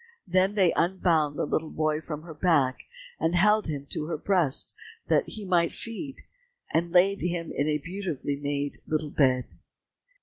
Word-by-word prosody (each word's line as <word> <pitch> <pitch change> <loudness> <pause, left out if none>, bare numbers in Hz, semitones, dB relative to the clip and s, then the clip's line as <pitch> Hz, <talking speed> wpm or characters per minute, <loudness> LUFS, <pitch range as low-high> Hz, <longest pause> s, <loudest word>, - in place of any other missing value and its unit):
Then 185 +3 +2
they 185 -5 +4
unbound 165 -4 +1
the - - 0
little 155 +1 -1
boy 155 0 -1
from 155 -1 -6
her 165 -1 -9
back, 145 -6 +1 0.3
and 165 +2 +1
held 210 +3 +4
him 145 -3 -4
to 150 - -2
her 165 - -2
breast 170 -5 +2 0.4
that - - +2
he 215 -2 -6
might 175 -3 +2
feed, 250 +5 -6 0.5
and 170 +1 +1
laid 190 +3 +4
him 175 -1 -2
in 145 - -1
a 150 -1 +1
beautifully 170 -3 -4
made 145 0 -3
little 155 -1 -1
bed. 130 -3 +2
165 Hz, 165 wpm, -27 LUFS, 150-185 Hz, 0.5 s, they